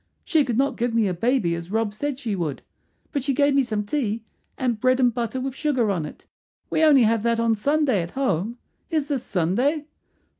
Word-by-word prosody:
She 315 -3 +3
could 245 -4 -2
not 275 +2 +1
give 240 -1 -1
me 225 -3 +3
a 185 - 0
baby 220 -1 +1
as 170 +1 -5
Rob 220 0 0
said 285 +4 -3
she 230 -7 -3
would, 160 -7 -3 0.5
but 280 - -2
she 275 -1 0
gave 285 +1 +3
me 275 - +4
some 215 -5 -2
tea, 225 -3 -2 0.3
and 245 -4 -1
bread 255 +2 +3
and 245 -2 +3
butter 240 +2 -2
with 265 0 -3
sugar 260 -7 +1
on 165 -6 -2
it. - - -13 0.5
We - - +1
only 285 -5 +6
have 225 0 +2
that 235 +1 +1
on 230 -1 +3
Sunday 275 - +1
at 170 +1 -6
home. 230 -3 0 0.3
Is 310 -4 -1
this 275 -4 0
Sunday?" 245 - 0
240 Hz, 215 wpm, -24 LUFS, 210-275 Hz, 0.5 s, only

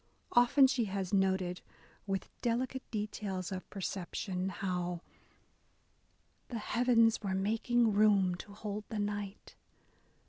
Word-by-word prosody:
Often 245 +3 +6
she 255 -3 +2
has 195 -1 -3
noted, 190 -2 +1 0.5
with 195 -1 -2
delicate 250 +2 -1
details 205 -4 -3
of 185 -1 -6
perception, 185 -1 -3
how 180 -2 -2 1.5
The 240 - -4
heavens 230 0 +3
were 195 -3 -1
making 225 +3 +2
room 200 -3 +4
to 175 +3 -8
hold 210 0 -5
the 220 - -4
night. 205 -1 -4
205 Hz, 110 wpm, -33 LUFS, 190-225 Hz, 1.5 s, Often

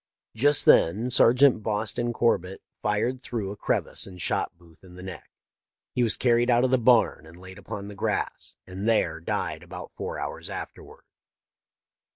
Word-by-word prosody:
" - - -67
' - - -46
Just 145 0 +6
then 110 +10 +4
Sergeant 125 -1 +5
Boston 110 +3 -2
Corbett 95 -6 0 0.2
fired 110 +5 -1
through 110 -6 -4
a - - -7
crevice - - -2
and 90 -2 -12
shot 85 - -2
Booth 85 -1 -21
in 90 -1 -15
the 90 - -11
neck. 95 -4 -9 0.6
He 125 - 0
was 115 -3 +3
carried 120 0 +2
out 120 0 +4
of 130 - +1
the 130 - +3
barn 120 -9 +3
and 85 +2 -14
laid 95 +1 -12
upon 100 0 -7
the 105 - -8
grass, 100 - -3
and 95 +4 -4
there 85 -7 +1
died 80 - -3
about - - -10
four - - -5
hours - - -6
afterward. - - -9
105 Hz, 180 wpm, -26 LUFS, 95-120 Hz, 0.6 s, Just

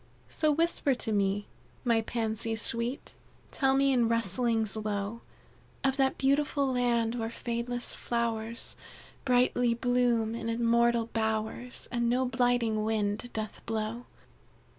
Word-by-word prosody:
"So, 310 -1 +1
whisper 300 -3 +1
to 235 -2 -3
me, 200 0 +1 0.4
my 230 -2 +3
Pansies 225 0 -2
sweet 235 +4 -1 0.4
Tell 270 -1 +2
me 275 0 +3
in 240 -3 +3
rustlings 230 0 +1
low, 215 +1 -3 0.6
Of 270 -1 +2
that 265 -1 +2
beautiful 280 +1 +2
land 235 -2 +1
where 225 -2 -2
fadeless 240 +1 -2
flowers 230 -1 -2 0.5
Brightly 245 -2 +3
bloom 240 -2 +1
in 230 0 -4
immortal 235 0 +2
bowers, 220 +2 -2
And 235 -1 +1
no 255 +2 +2
blighting 245 -3 +1
wind 215 +1 -1
doth 215 -1 -5
blow. 225 +2 -3
235 Hz, 120 wpm, -29 LUFS, 220-245 Hz, 0.6 s, my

